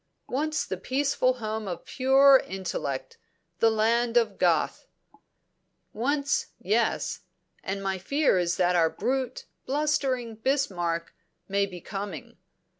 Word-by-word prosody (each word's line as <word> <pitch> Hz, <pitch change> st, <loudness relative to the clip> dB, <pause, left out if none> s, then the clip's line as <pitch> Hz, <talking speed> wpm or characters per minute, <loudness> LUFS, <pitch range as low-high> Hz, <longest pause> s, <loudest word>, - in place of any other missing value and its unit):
"Once 305 Hz, +4 st, -1 dB
the -, -, -4 dB
peaceful 270 Hz, -1 st, +1 dB
home 220 Hz, -3 st, -4 dB
of 175 Hz, -3 st, -5 dB
pure 270 Hz, +1 st, +5 dB
intellect, 175 Hz, -8 st, -4 dB, 0.4 s
the 225 Hz, -, +5 dB
land 230 Hz, +2 st, +2 dB
of 220 Hz, -4 st, +1 dB
Goethe." 170 Hz, -4 st, +1 dB, 1.1 s
"Once, 280 Hz, +5 st, 0 dB
yes. -, -, 0 dB, 0.4 s
And 195 Hz, +1 st, -3 dB
my 190 Hz, -1 st, -1 dB
fear 280 Hz, -, +2 dB
is 170 Hz, -1 st, 0 dB
that 180 Hz, -1 st, +2 dB
our 165 Hz, -2 st, +4 dB
brute, 260 Hz, +3 st, -2 dB, 0.2 s
blustering 270 Hz, -4 st, 0 dB
Bismarck 180 Hz, -10 st, -1 dB, 0.3 s
may 200 Hz, 0 st, +1 dB
be 180 Hz, -3 st, -9 dB
coming. 195 Hz, -6 st, -6 dB
225 Hz, 115 wpm, -27 LUFS, 185-265 Hz, 1.1 s, pure